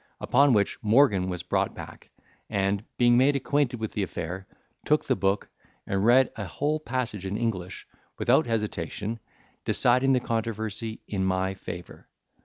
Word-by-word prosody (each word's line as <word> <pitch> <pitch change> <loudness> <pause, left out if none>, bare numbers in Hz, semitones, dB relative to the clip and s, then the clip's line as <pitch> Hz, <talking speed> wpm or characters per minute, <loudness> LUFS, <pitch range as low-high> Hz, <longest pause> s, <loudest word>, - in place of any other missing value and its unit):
Upon 140 -2 +4
which 100 -2 +1
Morgan 105 -5 +4
was 90 -1 -4
brought - - 0
back, - - -10 0.4
and, 100 0 0
being 120 0 +5
made 140 +2 +4
acquainted 140 -2 0
with 110 -1 -3
the 105 - -1
affair, 90 0 -4 0.4
took - - +2
the - - +2
book, 95 +1 0 0.4
and 95 0 -1
read 125 +3 +5
a 105 - -4
whole 150 - -1
page 120 -8 -3
in 95 +2 -3
English, 95 -6 -3 0.3
without - - +3
hesitation, 105 0 -3 0.4
deciding 125 +2 +3
the 130 - +3
controversy 110 -1 -3
in 95 -2 -2
my 95 0 0
favour. 90 -2 -9
110 Hz, 150 wpm, -27 LUFS, 95-120 Hz, 0.4 s, being